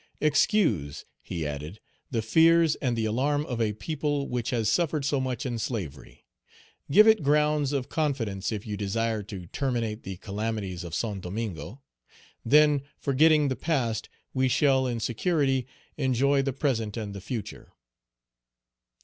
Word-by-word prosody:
Excuse," 150 - +1 0.2
he 85 -3 -4
added, 75 +7 -5 0.3
"the 115 -5 -1
fears 165 +6 +5
and 125 -4 -1
the 110 - 0
alarm 145 +7 0
of 120 -5 -3
a 105 -2 +1
people 145 +3 -2
which 120 -1 -2
has 115 -4 0
suffered 155 -4 +1
so 140 0 +1
much 130 +1 -3
in 120 -3 -2
slavery. 95 - -6 0.6
Give 210 +9 +7
it 220 -4 +6
grounds 150 0 +2
of 140 -3 -1
confidence 120 -12 -1
if 105 -2 -4
you 105 -2 -4
desire 110 +2 -1
to 95 -3 -8
terminate 115 - -2
the 95 -1 -7
calamities 100 -3 -4
of 85 -1 -5
Saint 105 -4 -2
Domingo; 100 - -5 0.6
then, 150 +2 +5 0.2
forgetting 150 +2 +4
the 130 - -1
past, 125 -5 -1 0.2
we 130 0 +2
shall 130 0 +3
in 120 -2 -2
security 135 +2 0 0.3
enjoy 135 0 +2
the 135 0 -1
present 120 -6 -1
and 105 -3 -4
the 100 - -7
future." 110 +1 -6
125 Hz, 150 wpm, -27 LUFS, 105-145 Hz, 0.6 s, Give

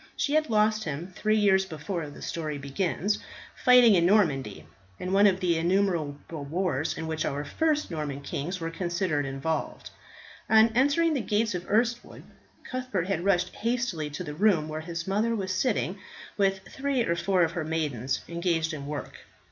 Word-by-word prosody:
She 285 - 0
had 310 -1 +2
lost 215 0 +2
him, 165 +5 -5
three 215 0 +1
years 195 -2 +4
before 160 -1 -5
the 145 - -11
story 155 -3 -3
begins, 175 +8 -1 0.4
fighting 250 -3 +7
in 175 -3 +4
Normandy, 140 - +2 0.3
in 185 +1 -4
one 200 +1 +6
of 190 -2 +2
the 170 -3 +2
innumerable 165 -4 -1
wars 160 -2 -1
in 165 - -4
which 160 -1 -2
our 145 +1 -2
first 300 - 0
Norman 150 -3 -4
kings 160 +6 -4
were 165 0 -4
constantly 170 -4 -1
involved. 135 +4 -3 0.6
On 220 +1 +6
entering 285 +8 +2
the 275 - 0
gates 215 -1 0
of 180 0 -5
Erstwood, 235 +2 0 0.4
Cuthbert 250 -9 -3
had 175 -3 -1
rushed 190 -2 +1
hastily 230 -10 -1
to 150 - -6
the 150 - -6
room 175 -3 +2
where 155 0 -4
his 170 0 -5
mother 215 +4 +1
was 190 -3 -2
sitting 200 -3 0 0.4
with 195 -1 +1
three 270 -2 -1
or 170 - 0
four 185 +1 +2
of 165 - +1
her 170 -1 -3
maidens, 150 -6 -2
engaged 170 -1 -1
in 140 -2 -6
work. 150 0 -6
180 Hz, 170 wpm, -27 LUFS, 155-210 Hz, 0.6 s, fighting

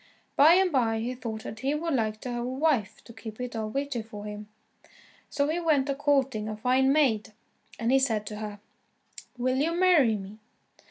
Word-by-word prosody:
By 305 +4 +7
and 375 -1 +3
by 230 -5 +1
he 240 +3 -3
thought 225 -3 -6
that 220 - -7
he 275 +4 0
would 330 +1 -2
like 215 -4 -1
to 250 - -5
have 240 0 -3
a - - -3
wife 260 -7 0
to 230 - -13
keep 220 -1 -9
it 250 -1 -5
all 220 -1 -3
vitty 275 0 -2
for 210 -2 -9
him. 210 0 -7 0.8
So 285 0 0
he 320 +3 -1
went 300 -5 +2
a - - +2
courting 270 -6 0
a 215 - -5
fine 260 +4 +3
maid, 245 -8 +2 0.4
and 235 +1 0
he 270 - +5
said 225 -6 0
to 210 0 -6
her: 210 -1 -6 0.8
"Will 255 +1 0
you 320 +5 +1
marry 340 -11 +4
me?" 200 +1 -8
250 Hz, 205 wpm, -27 LUFS, 220-285 Hz, 0.8 s, By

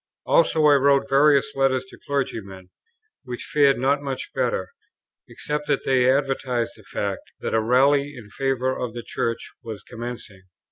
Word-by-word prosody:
Also 330 - +3
I 150 - +7
wrote 140 0 +3
various 140 0 +4
letters 135 -1 +1
to - - -15
clergymen, 100 -10 -4 0.5
which 125 -2 -6
fared 140 -2 +3
not 140 +3 +1
much 135 -2 -5
better, - - -1 0.6
except 150 0 -4
that 145 -2 0
they 130 -1 +4
advertised 135 -3 -1
the 110 - -16
fact, 100 -1 -5
that - - -3
a 110 - +3
rally 140 +5 +3
in 105 -4 -12
favour 130 0 -1
of 120 -2 -5
the 120 - -5
Church 115 0 -3
was 110 -5 -8
commencing. 115 -4 -8
130 Hz, 155 wpm, -23 LUFS, 115-140 Hz, 0.6 s, I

